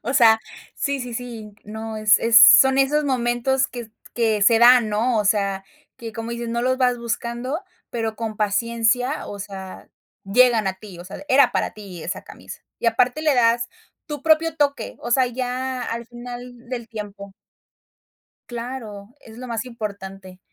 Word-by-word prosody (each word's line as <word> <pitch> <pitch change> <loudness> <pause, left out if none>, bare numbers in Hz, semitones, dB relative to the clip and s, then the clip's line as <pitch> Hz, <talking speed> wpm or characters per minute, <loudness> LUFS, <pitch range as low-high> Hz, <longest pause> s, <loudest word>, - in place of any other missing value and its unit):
O 255 +5 -3
sea, 225 -3 +6 0.4
sí, 280 -1 -2
sí, 250 -1 -6
sí, 225 -4 -7
no, 220 +1 -6
es 215 -1 +5
es 230 -1 +6
son 265 +4 +8
esos 295 +2 +2
momentos, 255 0 +1
que 235 -2 -9 0.2
que 220 -3 +1
se 225 +2 +5
dan, 240 -1 +7
¿no? 225 +2 +1
O 210 - 0
sea, 195 -1 0 0.3
que, 230 -2 -8
como 225 +1 -6
dices, 235 0 -4
no 235 +1 -2
los 255 +1 +1
vas 250 -1 +2
buscando, 235 +4 -3 0.3
pero, 225 -2 -3
con 220 -1 -5
paciencia, 230 +5 0
o 205 - -7
sea, 190 -2 -9 0.4
llegan 230 +1 +4
a 190 - -3
ti, 190 -2 -12
o 175 - -10
sea, 195 +9 -9
era 260 -1 +5
para - - -1
ti 195 -5 -10
esa 175 - -5
camisa. - - -11 0.2
Y - - -3
aparte 245 +5 +2
le 305 -3 +3
das 235 0 +2 0.4
tu 295 -2 -6
propio 320 +1 +3
toque, 280 -6 -1
o 240 - -6
sea, 255 +1 +4
ya 255 +1 -3
al 235 0 -4
final 245 0 -10
del 240 -3 -5
tiempo 200 -3 -8 1.2
Claro, 235 -3 -7
es 225 0 -14
lo 255 - -7
más 230 0 -3
importante. 195 -5 -8
235 Hz, 170 wpm, -22 LUFS, 215-250 Hz, 1.2 s, son